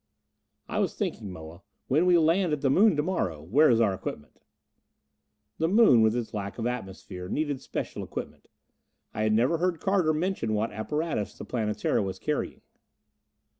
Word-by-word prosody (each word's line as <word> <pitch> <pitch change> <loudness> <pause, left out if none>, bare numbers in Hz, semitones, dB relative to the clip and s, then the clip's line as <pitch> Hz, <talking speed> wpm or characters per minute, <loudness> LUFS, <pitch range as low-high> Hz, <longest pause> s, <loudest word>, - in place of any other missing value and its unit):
"I - - -2
was - - 0
thinking, 100 - -3
Moa, 80 +1 -10 0.3
when 155 +7 +3
we 180 -1 +6
land 165 +1 +2
at 150 - -2
the 135 - +2
Moon 205 +4 +5
to 150 - +1
morrow 130 - -1
where 140 - +4
is 115 -2 +4
our 110 -4 +3
equipment?" 75 -5 -7 1.2
The 160 - +2
Moon, 195 - +6
with 110 +1 +3
its 120 -2 -3
lack 100 -2 -5
of 115 - -3
atmosphere, 95 -6 -5
needed 145 -1 -2
special - - -5
equipment. - - -7 0.7
I - - -3
had 110 0 +2
never 125 +9 +2
heard 175 -2 0
Carter 190 -5 +2
mention 155 - -1
what 110 +2 -1
apparatus 150 +2 -3
the - - -8
Planetara 105 -4 -1
was 95 -2 -3
carrying. - - -3
125 Hz, 170 wpm, -27 LUFS, 105-160 Hz, 1.2 s, we